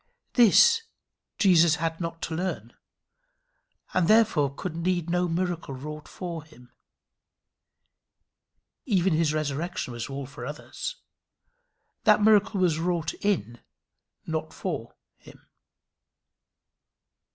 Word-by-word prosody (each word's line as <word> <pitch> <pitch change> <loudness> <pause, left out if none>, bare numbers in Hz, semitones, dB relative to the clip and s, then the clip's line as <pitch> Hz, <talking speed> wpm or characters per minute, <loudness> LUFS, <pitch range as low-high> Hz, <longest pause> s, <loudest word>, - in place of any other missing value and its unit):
This 455 - +6 0.6
Jesus 170 -5 +5
had 165 +2 -3
not 165 -1 -5
to 160 - -3
learn, 185 +3 -4 1.2
and 185 -3 +2
therefore 215 -11 +4
could 160 +4 -6
need 175 0 -1
no 180 0 +1
miracle 170 -4 -2
wrought 150 +3 -8
for 170 -4 -6
him. 125 -5 -19 2.2
Even 190 -5 +2
his 160 -1 +2
resurrection 155 -1 -3
was 120 +3 -5
all 140 0 -5
for 125 -2 -10
others. 150 - -6 1.1
That 210 -1 +5
miracle 210 -1 +4
was 170 -4 +2
wrought 170 -1 -1
in, 120 - -1 0.7
not 160 -1 -4
for 145 -11 -5 0.2
him. - - -17
165 Hz, 105 wpm, -26 LUFS, 150-185 Hz, 2.2 s, This